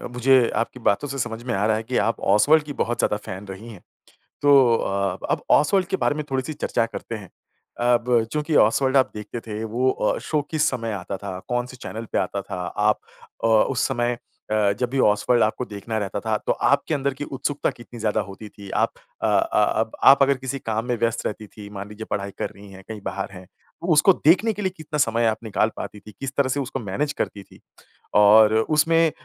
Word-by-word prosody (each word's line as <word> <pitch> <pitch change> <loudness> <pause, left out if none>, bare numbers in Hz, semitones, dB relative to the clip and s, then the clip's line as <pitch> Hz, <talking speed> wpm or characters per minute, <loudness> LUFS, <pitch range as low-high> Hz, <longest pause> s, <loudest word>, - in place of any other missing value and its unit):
मुझे 125 0 +4
आपकी 115 +2 -2
बातों 115 +4 +1
से 140 0 -5
समझ 115 -2 -3
में 125 -2 -2
आ 100 +2 +1
रहा 110 - +3
है 110 - -4
कि 125 +2 -2
आप 115 - -1
ओसवाल्ड 145 +9 +5
की 150 -1 -7
बहुत 120 +1 -1
ज़्यादा 105 - +1
फैन 95 +2 -7
रही 95 +4 -9
हैं। 90 - -14 0.6
तो 135 -5 +6
अ, 100 0 -1
अब - - 0
ओसवाल्ड 185 +4 +4
के 190 - -1
बारे 145 - +2
में 150 - -3
थोड़ी-सी 135 +4 -2
चर्चा 140 - 0
करते 115 0 -7
हैं। 100 -5 -9 0.6
अब 120 -1 +2
चूँकि 150 +1 -1
ओसवाल्ड 130 +5 +4
आप 130 - +3
देखते 105 +3 -6
थे, 110 0 -4
वो 120 +4 0
अ, - - 0
शो 155 -2 -1
किस 155 -1 +2
समय 115 -3 -3
आता 95 +2 -5
था? 95 -1 -6
कौन 120 0 0
से 130 0 -12
चैनल 115 -1 -7
पे - - 0
आता 100 +1 -2
था? 90 -2 -5
आप 105 0 +2 0.4
अ, - - +3
उस 115 +3 +3
समय 120 -2 -1 0.3
अ, 105 -2 +3
जब 125 - 0
भी 135 +1 -1
ओसवाल्ड 105 +3 +3
आपको 110 +3 -1
देखना 110 +1 -5
रहता 100 -1 -3
था, 110 +1 -1
तो - - -2
आपके 140 +3 +1
अंदर 140 -1 0
की 135 - -6
उत्सुकता 140 +1 -2
कितनी 120 0 -12
ज़्यादा 110 0 0
होती 105 +2 -10
थी? 100 -1 -12
आप - - +1 0.3
अ, - - 0
अ, 110 - +2
अब 110 - -3 0.2
आप 140 0 +4
अगर 140 -1 +2
किसी 130 +1 -4
काम 110 0 -2
में 125 - +1
व्यस्थ 115 -1 -1
रहती 105 0 -4
थीं, 100 0 -11
मान 100 +1 -7
लीजिए 105 +1 -8
पढ़ाई 100 -1 -3
कर - - -2
रही 100 +1 -14
हैं, 95 0 -12
कहीं 110 -2 -7
बाहर 100 +1 -4
हैं, 95 -1 -11 0.4
तो 170 - -5
उसको 170 +6 +6
देखने 195 +8 +5
के 210 - -6
लिए 190 -2 0
कितना 155 -1 -5
समय 115 -3 +2
आप 110 +1 -1
निकाल 110 0 0
पाती 105 +1 -6
थीं? 105 +1 -13
किस 135 +1 -5
तरह 140 -2 +2
से 140 - 0
उसको 135 0 -3
मैनेज 130 +7 -2
करती 100 -7 -4
थीं? - - -19 0.6
और 105 +1 +7
उसमें 160 +7 +3
115 Hz, 225 wpm, -23 LUFS, 105-135 Hz, 0.6 s, और